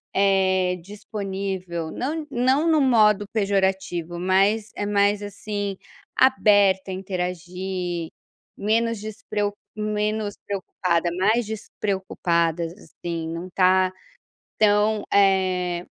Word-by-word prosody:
eh, 190 -2 +3
disponível. 190 -3 -5
Não 305 +4 -3
não 260 +5 +2
no 315 -2 +4
modo 215 -6 +4
pejorativo, 190 -4 0
mas 195 +4 +2
é 205 - -2
mais 205 0 +2
assim, 205 -1 -4 0.4
aberta 205 -7 +4
a - - -3
interagir, 180 -2 -4 0.5
menos 230 +2 +1
despreo 210 -1 -3 0.2
menos 210 0 -1
preocupada, 180 -3 -1
mais 220 +5 +3
despreocupadas, 175 -6 -1
assim. 170 -3 -6
Não 165 +2 -5
tá 185 0 +3 0.7
tão, 210 0 +3
eh, 185 -3 +2
195 Hz, 95 wpm, -24 LUFS, 185-210 Hz, 0.7 s, no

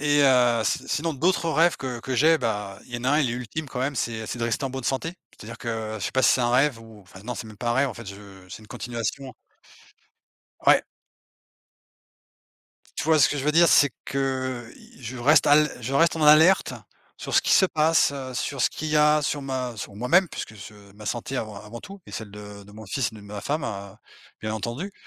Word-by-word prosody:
Et 145 0 +3
heu, 125 -4 +4
si 100 - -1
sinon 155 +4 -1
d'autres 165 +3 +1
rêves 165 +1 +3
que 125 -3 -5
que 130 +3 -4
j'ai, 160 +6 +4
bah, 105 -5 -3
il 120 - -10
y - - -2
en - - -10
a 130 - +2
un, 150 - +3
il 130 -5 +1
est - - -2
ultime 125 +6 -5
quand 125 -2 -5
même: 140 +1 -1
c'est 115 -1 -3
c'est 120 - -5
de 115 - -1
rester 115 +4 -1
en 135 - -2
bonne 130 -2 -6
santé, 160 +6 -2 0.2
c'est-à-dire 115 +2 -11
que 110 -2 -4
je 95 - -5
sais - - -3
pas 130 - +1
si - - +6
c'est - - 0
un 120 -1 +1
rêve 135 0 +3
ou 115 -2 -14
enfin, 95 0 -15
non, 125 0 -4
c'est 110 - -7
même 105 - -12
pas 120 +2 -2
un - - +2
rêve, 135 +2 +2
en 120 - -7
fait, 115 -3 -10
je 100 -1 -11
c'est 95 - -9
une 105 - -17
continuation. 120 +2 -5 1.3
Ouais. - - +6 2.2
Tu - - -2
vois 160 -1 +4
ce - - +6
que 150 - -2
je 135 - -3
veux 150 - +2
dire? 170 +1 +6
C'est 145 - +5 0.2
que, 130 -3 -3
i - - -18
je 120 +2 -6
reste 145 +4 +4
à 145 - +7
l 150 0 +4
je 130 +4 -4
reste 165 +4 +3
en 160 - -2
alerte 155 +5 +6 0.5
sur - - -5
ce - - +5
qui - - +1
se 190 - +6
passe, 160 -3 +3
heu, 130 -2 -6
sur 130 +1 -3
ce - - +3
qu'il 155 - -5
y 150 - +1
a, 150 0 +4
sur 145 0 -2
ma 130 -3 -4
sur 100 0 -7
moi-même 155 - +3
puisque 110 - -7
je 105 +1 -11 0.2
ma 105 0 -12
santé 120 +5 -3
avant 110 -3 -4
avant 115 +2 -9
tout 195 +1 -11
et - - -12
celle 110 -3 -7
de 105 0 -10
de 105 - -16
mon 110 -1 -11
fils 120 +3 -2
et - - -13
de 105 - -12
ma 100 0 -8
femme, 150 0 -2
heu, 100 -4 -6 0.5
bien 110 0 -3
entendu. 120 - -5
125 Hz, 250 wpm, -25 LUFS, 110-145 Hz, 2.2 s, à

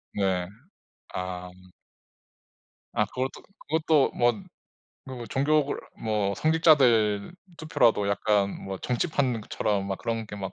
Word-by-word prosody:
네. 95 -3 0 0.7
아. 90 -1 -5 1.5
아. 105 - +3
그것도 130 +3 -4 0.3
그것도 155 -2 +3
뭔 120 -3 +1
그 - - -21 0.6
뭐 125 -3 -7
종교 150 +4 +2
그러 145 - -3 0.2
뭐 105 -3 0
성직자들 135 -8 +3 0.2
투표라도 120 -9 +2
약간 100 -1 +1
뭐 95 -1 -5
정치판 125 - 0
그 - - -14
처럼 100 -2 -1
막 95 - -3
그런 115 -1 -3
게 105 - -7
막 95 -2 -5
115 Hz, 220 characters per minute, -27 LUFS, 100-135 Hz, 1.5 s, 아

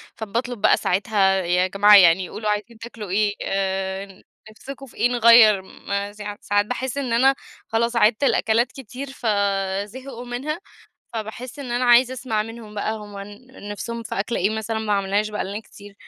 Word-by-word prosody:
فباطلب 230 +2 -4
بقى - - +5
ساعتها 195 0 +1
"يا 180 +1 +2
جماعة 205 +2 +6
يعني 180 -1 +6
قولوا 215 -1 -4
عايزين 210 +2 -3
تاكلوا 225 -3 -9
إيه؟ 205 +2 +1
آآ 190 0 -3 0.3
نفسُكم 275 +5 -10
في 255 - -18
إيه؟ 245 - +3
نغيّر." 230 -4 +6
م 200 +1 -5
سا 205 0 -7
ساعات 205 0 +1
باحس 255 +3 -4
إن 260 -4 -2
أنا 265 +3 +4 0.3
خلاص 235 +1 0
عيدت 220 +3 +3
الأكلات 235 -2 +2
كتير 265 +1 -8
فزهقوا 205 +2 -2
منها، 265 +7 -4 0.5
فباحس 230 +4 -6
إن 270 -3 -6
أنا 245 +1 0
عايزة 245 +1 +5
أسمع 235 -4 -2
منهم 225 -1 -10
بقى 210 +1 -2
هُم 205 -2 -10
ن 205 +3 -11
نفسُهم 235 +3 -5
في 225 - -6
أكلة 220 +4 -2
إيه 195 +4 +1
مثلًا 220 0 -3
ما 220 -1 -2
عملناهاش 200 +1 0
بقى 210 - -3
لنا 200 +3 -5
كتير 205 -2 -15
215 Hz, 170 wpm, -22 LUFS, 200-240 Hz, 0.5 s, جماعة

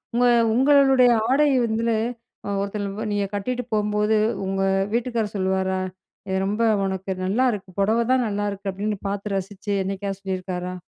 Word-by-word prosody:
உங்க 245 - +3 0.3
உங்களுடைய 270 -1 +5 0.2
ஆடை 295 +3 +4 0.2
வந்து 225 0 0 0.5
அ - - -3
ஒருத்தலு 200 0 -3
வ 220 - -3
நீங்க 205 -1 0
கட்டிட்டு 250 +5 -2
போகும்போது 210 +1 +1 0.3
உங்க 195 0 -1 0.3
வீட்டுக்காரர் 230 -3 -1
சொல்லுவாரா, 190 0 0 0.5
"இது 190 - 0
ரொம்ப 210 +4 0 0.2
உனக்கு 190 0 -3
நல்லாருக்கு. 210 -1 0
பொடவ 220 +4 +2
தான் 255 -2 +3
நல்லாருக்கு" 205 -1 -3
அப்படீன்னு 205 +2 -3
பார்த்து 200 0 -3
ரசிச்சு, 200 +1 -4
என்னைக்காவது 195 0 -4
சொல்லியிருக்காரா? 185 -1 -4
205 Hz, 140 wpm, -23 LUFS, 195-230 Hz, 0.5 s, உங்களுடைய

